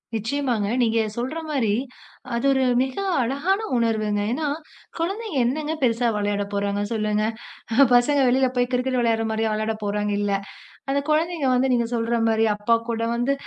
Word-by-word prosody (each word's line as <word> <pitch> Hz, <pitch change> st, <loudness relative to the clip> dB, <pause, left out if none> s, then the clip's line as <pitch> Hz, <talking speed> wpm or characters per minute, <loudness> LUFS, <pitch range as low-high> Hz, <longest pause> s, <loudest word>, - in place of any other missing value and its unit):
நிச்சயமாங்க. 230 Hz, -1 st, -1 dB, 0.2 s
நீங்கள் 225 Hz, -2 st, +1 dB
சொல்கிற 260 Hz, +7 st, -3 dB
மாதிரி, 240 Hz, -8 st, +1 dB, 0.6 s
அது 235 Hz, -, -1 dB
ஒரு 265 Hz, -1 st, +2 dB, 0.2 s
மிக 265 Hz, -1 st, -2 dB, 0.3 s
அழகான 285 Hz, -, 0 dB, 0.2 s
உணர்வுங்க. 215 Hz, -3 st, 0 dB
ஏனெனென்றால் 300 Hz, +3 st, -2 dB, 0.4 s
குழந்தைகள் 385 Hz, -, -1 dB
என்னங்க 300 Hz, +5 st, -1 dB
பெருசா 240 Hz, 0 st, +2 dB
விளையாடப்போறாங்க 205 Hz, 0 st, -1 dB
சொல்லுங்க. 215 Hz, -1 st, 0 dB, 0.7 s
பசங்கள் 265 Hz, +2 st, +4 dB
வெளியில் 255 Hz, 0 st, +2 dB
போய்க் 245 Hz, 0 st, +1 dB
cricket 255 Hz, +1 st, 0 dB
விளையாடுகிற 225 Hz, -1 st, +1 dB
மாதிரியா 220 Hz, 0 st, 0 dB
விளையாடப்போறாங்க, 210 Hz, -1 st, -2 dB
இல்லை. 200 Hz, -1 st, +1 dB, 0.5 s
அந்தக் 280 Hz, +1 st, 0 dB
குழந்தைகள் 310 Hz, -4 st, +1 dB
வந்து 255 Hz, +1 st, +2 dB
நீங்கள் 235 Hz, -1 st, 0 dB
சொல்கிற 230 Hz, 0 st, 0 dB
மாதிரி 225 Hz, 0 st, +2 dB
அப்பா 210 Hz, +3 st, +2 dB
கூட 230 Hz, -1 st, -1 dB
வந்து 245 Hz, +4 st, +1 dB
235 Hz, 145 wpm, -23 LUFS, 215-270 Hz, 0.7 s, பசங்கள்